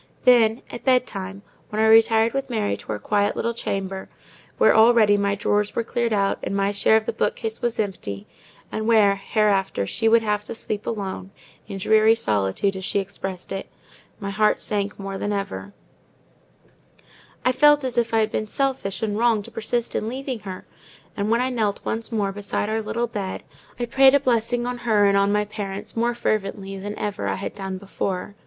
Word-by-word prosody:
Then 235 -2 +5
at - - -8
bed 255 -1 +4
time, 195 -1 -7 0.3
when 210 - -3
I 220 - +4
retired 225 0 +5
with 275 0 -2
Mary 215 -4 0
to - - -14
our 105 - -2
quiet 205 - 0
little 235 - -1
chamber, 195 -4 -4 0.5
where - - +5
already 220 -2 +6
my 200 0 +1
drawers 205 +1 0
were 235 - 0
cleared 235 0 -1
out 200 -2 +1
and - - -3
my 200 0 +1
share 205 +2 +4
of 220 - -2
the - - -2
bookcase 220 0 -2
was 240 -1 -1
empty—and 195 - -6
where, 210 -3 +5
hereafter, 195 - +1
she 225 - +1
would 230 0 +5
have 210 -1 0
to - - -5
sleep 210 -2 -4
alone, 195 -3 -4 0.4
in 195 - -6
dreary 220 +3 +4
solitude, 105 - 0
as 190 - -6
she 200 - -1
expressed 195 -2 -4
it—my 200 +1 -9
heart 215 +2 +2
sank 205 -1 -2
more 195 -1 -5
than 205 - -2
ever: 100 - -4 1.7
I 255 - +5
felt 295 +2 +5
as 255 -2 -2
if 235 -1 +1
I 225 -1 +3
had 215 0 0
been 215 - -2
selfish 260 -6 -2
and 210 -2 -1
wrong 230 -3 +2
to - - -11
persist 230 +1 -2
in 220 - -1
leaving 260 -1 -4
her; 190 -3 -8 0.5
and 205 +1 -1
when 230 +2 +3
I 260 +1 0
knelt 215 -4 -1
once 225 +2 -3
more 205 -3 0
beside 205 +1 -3
our 220 +1 0
little 235 +2 -2
bed, 205 -5 -5 0.4
I 240 - 0
prayed 265 +3 +5
for - - +7
a - - -6
blessing 240 -1 +1
on 245 0 -3
her 220 -4 +3
and 200 0 +4
on 200 0 +3
my 210 0 +1
parents 205 0 -6
more 235 +1 0
fervently 195 -4 -2
than 205 +2 -6
ever 205 -1 -3
I - - 0
had 195 - -5
done 190 -1 -5
before. 195 0 -4
210 Hz, 195 wpm, -23 LUFS, 200-230 Hz, 1.7 s, for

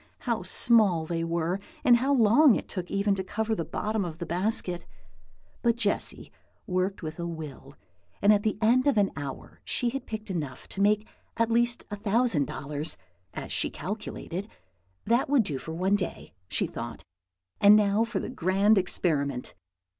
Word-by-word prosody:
how 235 -4 -1
small 185 -3 +4
they 165 0 -2
were, 170 +2 -1 0.2
and 245 -4 +6
how 265 +4 0
long 245 +1 +6
it - - -4
took 180 -3 -5
even 200 +1 +1
to 190 -1 -2
cover 220 +4 -2
the 170 - -1
bottom 215 +6 -2
of 165 -3 -5
the 170 - -5
basket. 180 0 0 0.8
But 235 -1 +2
Jessy 210 -4 -1 0.3
worked 185 -1 -1
with 155 +2 -6
a 170 - -2
will, 150 -4 -8 0.4
and 205 +1 +6
at 205 - +2
the 215 -1 -1
end 250 +5 +4
of 280 - +3
an 200 -2 +3
hour 140 -2 -7
she 245 - 0
had 275 +3 -5
picked 215 -2 -5
enough 145 -8 -5
to 195 - -4
make 210 +1 +3 0.3
at 230 0 +1
least 240 +1 +1
a - - -2
thousand 205 - +1
dollars, 145 +3 -3 0.4
as - - -6
she - - 0
calculated. 205 -1 -5 0.6
That 235 +5 +2
would 280 -5 +4
do 145 -8 -4
for 160 - -7
one 190 +4 +2
day, 185 - -6
she - - 0
thought; - - -7 0.6
and 205 +1 +8
now 210 +1 +3
for 230 -4 -2
the - - -5
grand 195 +4 +3
experiment! 140 -8 -1
200 Hz, 175 wpm, -27 LUFS, 170-220 Hz, 0.8 s, and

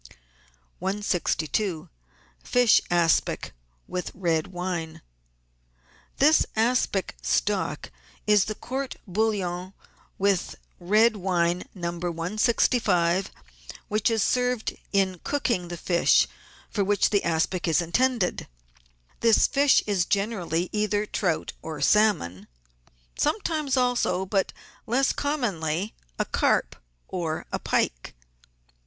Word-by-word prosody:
162— 185 -2 -1 0.6
FISH 245 -3 +4
ASPIC 170 - +1 0.3
WITH 180 - -4
RED 165 -4 0
WINE 175 -3 -5 1.1
This 305 +3 +5
aspic 225 - +1
stock 60 - -1 0.3
is 210 -2 +4
the 215 - -4
Court 265 +3 -4
bouillon 185 -3 -1 0.4
with 195 -2 +1 0.2
red 215 +5 +3
wine 180 -2 0
No. 170 -2 -3
165, 180 +1 +1 0.6
which 215 0 +1
has 225 -3 +2
served 250 -2 0 0.2
in 190 -3 +1
cooking 235 -11 -1
the 175 0 -6
fish 170 0 +3 0.4
for 205 - 0
which 200 0 +2
the 205 -2 +2
aspic 170 +2 0
is 165 -1 +3
intended; 205 +3 0 0.7
this 230 -2 +5
fish 285 0 +4
is 195 -4 +1
generally 195 -5 -1
either 210 0 0
trout 180 -6 -1
or 160 -2 -6
salmon; 145 - +2 0.7
some 305 +9 +2
times 305 -6 -1
also, 245 -7 +1
but 195 0 0 0.4
less 260 +4 +2
commonly, 205 - -2 0.2
a - - 0
carp - - +1 0.3
or 165 -4 -3
a - - -2
pike. - - -1
195 Hz, 105 wpm, -26 LUFS, 175-225 Hz, 1.1 s, This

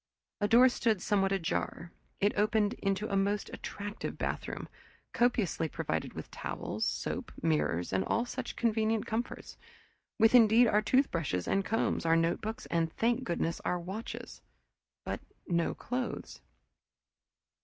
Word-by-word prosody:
A 205 - +2
door 240 +4 +7
stood 230 -4 +1
somewhat 195 0 +1
ajar; 170 -2 -2 0.3
it 205 +1 +2
opened 210 0 +2
into 195 +1 0
a 200 - -1
most 200 +1 0
attractive 205 +1 -5
bathroom, - - -3 0.5
copiously 220 -9 +1
provided 145 - -3
with - - -8
towels, - - -3
soap, - - -3
mirrors, 80 +3 +1
and 95 0 +2
all 235 +2 +1
such 250 0 -5
convenient 220 -1 +1
comforts, 230 +2 -4 0.6
with 225 +1 +5
indeed 230 0 +7
our 210 -2 +3
toothbrushes 170 - +1
and 195 - +2
combs, 225 - 0
our 165 0 +4
notebooks, 170 +7 0
and 165 -1 0
thank 240 +3 +1
goodness, 170 -3 -1
our 180 - -1
watches 190 +6 -7 0.6
but - - -3 0.3
no 170 -1 +1
clothes. 250 +1 -4
205 Hz, 135 wpm, -31 LUFS, 170-225 Hz, 0.6 s, door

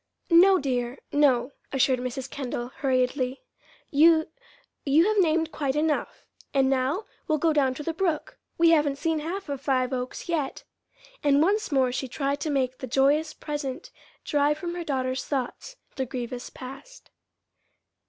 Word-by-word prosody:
"No, 375 +3 +7
dear, 250 -4 -2
no," 275 -3 +3 0.2
assured 260 -1 +2
Mrs. 255 +1 -4
Kendall, 250 -3 -4
hurriedly. 255 - 0 0.5
"You 315 +2 +5 0.5
you 300 +4 +4
have 430 0 +2
named 325 -2 +2
quite 275 -2 -2
enough. 305 0 -1 0.3
And 270 -1 +3
now 270 +10 0 0.2
we'll 310 -2 +2
go 320 +1 +2
down 270 -3 +2
to 295 - -6
the 330 - -2
brook. 335 -3 -2 0.2
We 335 0 +5
haven't 295 -3 +3
seen 320 +2 -1
half 350 +5 -5
of 280 -2 -4
Five 260 -2 0
Oaks 250 +5 -4
yet." 310 -6 -2 0.6
And 285 -1 +4
once 405 +6 +2
more 260 -3 +3
she 265 +1 -3
tried 280 +3 -2
to 310 - -3
make 260 -3 0
the 260 - -5
joyous 285 +5 +2
present 295 0 -5 0.3
drive 295 0 +2
from 345 +1 -4
her 350 0 -4
daughter's 260 -3 -1
thoughts 280 - -4 0.2
the 265 -1 -1
grievous 245 0 -5
past. 270 - -11
280 Hz, 155 wpm, -26 LUFS, 260-320 Hz, 0.6 s, No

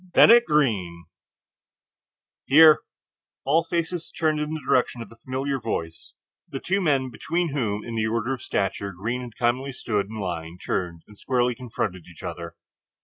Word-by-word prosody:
"Bennett 235 +1 +8
Greene." 95 - +1 1.4
"Here!" 155 +2 +8 0.7
All 155 +5 +3
faces 170 +1 -2
turned 155 -2 0
in 150 0 -2
the - - -4
direction 125 -1 +2
of - - -15
the 115 - -16
familiar 135 +3 -3
voice; 80 -7 -5 0.3
the 135 - -5
two 195 +6 0
men 135 -6 +1
between 170 +8 -1
whom 105 -7 -2
in 115 - -6
the 110 -1 0
order 115 +3 -1
of 130 - -6
stature 100 0 -2
Greene 115 +8 -3
had 120 -3 -10
commonly 125 +3 0
stood 105 -5 -1
in 110 +1 -7
line 85 -3 -4
turned 85 -2 -3
and 105 - -16
squarely 125 +2 0
confronted 110 -7 -4
each 85 -2 -14
other. 85 -1 -6
120 Hz, 160 wpm, -25 LUFS, 100-145 Hz, 1.4 s, Bennett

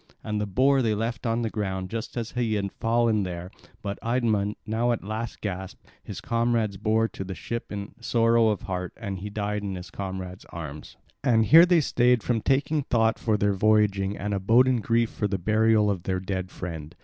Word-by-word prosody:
And 105 -1 -2
the 105 - -2
boar 135 +7 +3
they 110 -3 +1
left 115 +2 -3
on 115 +1 0
the 115 - -1
ground 95 -2 -3
just 115 +2 -5
as 115 -1 -3
he 120 -3 0
had 100 -1 -2
fallen 115 -1 +2
there; 90 -1 -5 0.3
but 100 -1 -4
Idmon, 115 -4 0
now 115 +3 0
at 120 - -1
the - - -13
last 110 +2 -4
gasp, 95 -2 -5 0.3
his - - -7
comrades 115 -3 0
bore 110 +3 +2
to - - -6
the 95 0 -6
ship 115 0 -5
in 100 0 -6
sorrow 115 -1 +3
of 105 -2 0
heart, 90 -1 -4
and 100 -5 -5
he 105 +3 -6
died 105 0 -2
in 100 -2 -4
his 90 0 -8
comrades' 95 -2 -6
arms. 75 -3 -8 0.3
And 115 -4 +3
here 165 +8 +8
they 175 -2 +4
stayed 125 -4 +2
from 115 -3 0
taking 140 +5 +1
thought 115 -4 +1
for 110 -2 +1
their 100 0 +2
voyaging 100 -1 +2
and 105 +1 -3
abode 115 +6 +4
in 125 -3 +2
grief 115 +1 +1
for 105 - -1
the 100 -1 -1
burial 110 +2 +3
of 95 -3 -3
their 95 +1 -2
dead 95 -1 -4
friend. 80 -3 -7
110 Hz, 210 wpm, -26 LUFS, 95-115 Hz, 0.3 s, here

